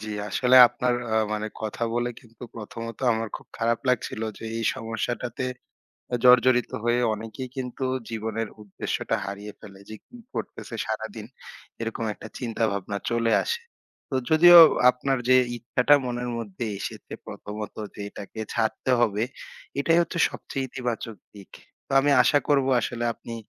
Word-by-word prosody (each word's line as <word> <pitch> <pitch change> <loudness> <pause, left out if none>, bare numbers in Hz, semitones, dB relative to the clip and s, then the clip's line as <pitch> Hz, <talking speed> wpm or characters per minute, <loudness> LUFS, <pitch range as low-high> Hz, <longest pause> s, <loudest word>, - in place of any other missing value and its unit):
জি, 110 - -7 0.2
আসলে 125 +5 +4
আপনার, 125 0 0 0.2
আ - - +2 0.2
মানে, 105 0 -2 0.2
কথা 110 +2 -4
বলে 120 0 0
কিন্তু 115 -2 -18
প্রথমত 115 +1 -7
আমার 115 0 -2
খুব - - -17
খারাপ 115 0 +1
লাগছিল 115 -2 0 0.2
যে, - - -9
এই 115 - -2
সমস্যাটাতে 120 +1 -3 0.8
জড়জড়িত 125 0 +5
হয়ে 120 +1 +2
অনেকেই 115 +4 -7
কিন্তু 130 0 -4 0.3
জীবনের 110 0 -3
উদ্দেশ্যটা 100 -2 -3
হারিয়ে 100 +1 -7
ফেলে, 100 -2 -13
যে 110 - -7
কি - - -17 0.2
করতেছে - - -6
সারাদিন, - - -5 0.6
এরকম 115 0 -3
একটা - - -11
চিন্তাভাবনা 110 -5 -2
চলে 115 -1 +1
আসে। 470 0 -2 0.5
তো 135 - -2
যদিও 175 +2 +9 0.3
আপনার 130 +2 0
যে 130 - +7 0.2
ইচ্ছাটা 125 +4 +3
মনের 125 0 -3
মধ্যে 115 0 -5
এসেছে, - - -7
প্রথমত, 105 0 -7 0.2
যে - - -7
এটাকে 100 +2 -9
ছাড়তে 115 +3 0
হবে, 110 -2 +2 0.6
এটাই 165 +4 +3
হচ্ছে 170 0 -3
সবচেয়ে 135 -1 -5
ইতিবাচক 120 -3 -4 0.2
দিক। 100 -2 -13 0.4
তো - - -11
আমি 145 +1 +2
আশা 145 +3 +4
করব, 140 -2 +3 0.2
আসলে 120 0 -3
আপনি, 115 - -10
115 Hz, 145 wpm, -25 LUFS, 110-125 Hz, 0.8 s, যদিও